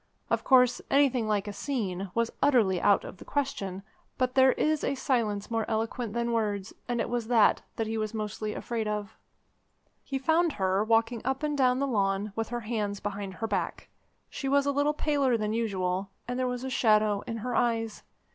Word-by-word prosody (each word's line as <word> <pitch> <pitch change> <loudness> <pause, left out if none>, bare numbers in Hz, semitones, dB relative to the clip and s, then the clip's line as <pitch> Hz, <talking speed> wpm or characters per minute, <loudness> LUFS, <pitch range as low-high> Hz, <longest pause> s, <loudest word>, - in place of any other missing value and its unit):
Of - - +1
course, 250 -2 +5
anything 265 -5 +3
like 210 -1 0
a 205 - -4
scene 200 -6 -3
was 230 0 +1
utterly 225 -11 +3
out 200 - +4
of - - -9
the - - -11
question; 200 -10 -3 0.3
but 255 -1 0
there 260 0 +6
is 310 -1 0
a - - 0
silence 225 -6 -1
more 225 -1 +1
eloquent 225 0 -2
than 235 0 -1
words, 210 -3 -1
and 240 -1 -1
it - - 0
was 240 -2 -2
that 230 -3 +4
that 225 - -1
he 220 0 -2
was 215 -1 -2
mostly 215 -1 -4
afraid 230 -2 -3
of. 210 -1 -3 0.9
He 270 - -3
found 320 +4 +2
her 190 0 +1
walking 230 +1 +2
up 265 +3 -2
and 300 -1 0
down 255 -2 +3
the 280 - +1
lawn 200 -4 0
with 225 -1 -2
her 240 0 -3
hands 210 -3 -2
behind 200 -2 -5
her 225 - -3
back. - - -3 0.4
She 270 - -4
was 280 0 +3
a 285 - +2
little 290 +2 +1
paler 280 -6 +2
than 215 -1 -1
usual, 195 -4 -1 0.2
and 245 +1 -3
there 255 - +1
was 250 0 -3
a 265 - -4
shadow 215 -4 +3
in 230 - -3
her 245 +3 -3
eyes. 225 -2 0
230 Hz, 200 wpm, -28 LUFS, 210-255 Hz, 0.9 s, there